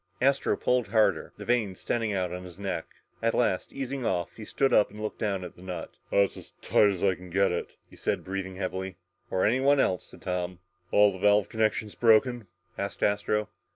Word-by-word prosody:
Astro 140 +1 +2
pulled 125 -3 +1
harder. 110 +1 +2
The - - -8
veins 110 -6 0
standing 115 -2 -1
out 90 -3 -1
on 90 0 -5
his 90 0 -11
neck. 95 -5 -3 0.3
At 115 0 +1
last, 95 -6 +1
easing 135 -1 -4
off, 85 -6 -1
he 110 - -8
stood 135 +4 +1
up 105 - +5
and 105 - -12
looked 110 0 -4
down 100 -4 -1
at - - -8
the - - -16
nut. 90 -2 -6 0.2
"That's 100 -1 +3
as - - -12
tight 105 - +4
as 95 -3 -3
I 95 -1 +4
can 90 +1 -11
get 100 +2 +2
it," 85 - -4
he - - -17
said, - - -1
breathing 95 0 -4
heavily. 95 -1 -4 0.3
"Or 95 - +1
anyone 135 +5 +4
else," 90 -8 +1
said - - -15
Tom. 90 -1 -2 0.3
"All 105 0 +5
the 95 - -8
valve 105 0 +4
connections 110 -1 0
broken?" 115 0 +3 0.3
asked 100 0 -3
Astro. 105 +1 +1
100 Hz, 205 wpm, -28 LUFS, 95-110 Hz, 0.3 s, up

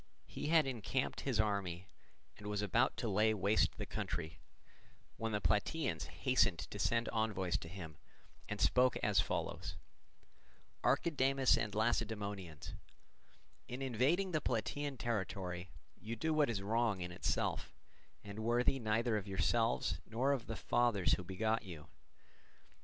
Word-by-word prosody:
He - - -5
had 160 -1 +5
encamped 130 +1 -2
his 130 -5 -1
army 100 -4 0 0.5
and 105 - -9
was 105 0 -1
about 115 +5 +2
to 115 0 -2
lay 110 +2 +3
waste 100 +2 +2
the - - -3
country, 80 -1 -4 0.8
when 115 0 -2
the 105 - 0
Plataeans 105 - 0
hastened 125 -9 +2
to 80 +6 -7
send 115 +3 +1
envoys 105 -7 0
to - - -8
him, 80 -4 -8 0.5
and - - -3
spoke 125 0 +4
as - - +3
follows: - - -2 1.1
"Archidamus 135 -1 +3
and 105 -2 -2
Lacedaemonians, 105 -7 -2 0.9
in 125 +2 -5
invading 135 - +2
the 155 -2 +1
Plataean 135 +4 -2
territory, 95 -6 -3 0.3
you 115 +2 -5
do 160 +8 0
what 150 -3 +3
is 100 -4 -2
wrong 110 -2 +1
in 90 0 -4
itself, 90 - -1 0.5
and 100 +1 -7
worthy 120 +4 +2
neither 110 0 +1
of 100 -1 -5
yourselves 95 - +1
nor 125 +5 +1
of 130 -4 -1
the 115 - -3
fathers 120 -5 +2
who 90 - 0
begot 110 +5 0
you. 85 -7 -9
110 Hz, 140 wpm, -36 LUFS, 95-125 Hz, 1.1 s, had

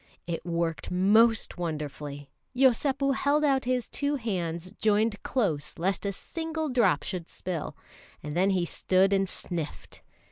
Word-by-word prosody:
It 170 -1 -4
worked 170 -1 -2
most 210 +3 +3
wonderfully. 150 -3 -5 0.2
Yosépu 270 +2 +3
held 285 +3 +2
out 270 -3 +2
his 250 -1 0
two 285 0 -1
hands 185 -7 -3
joined 215 0 +2
close 180 - -1
lest 190 +4 -1
a - - 0
single 320 - -4
drop 245 -3 +3
should 175 -3 -5
spill, 175 -4 -5 0.5
and 150 +1 -5
then 190 +3 +3
he 185 -3 +1
stood 190 +3 +3
and 195 -1 +2
sniffed. 170 -5 -6
195 Hz, 140 wpm, -28 LUFS, 170-250 Hz, 0.5 s, most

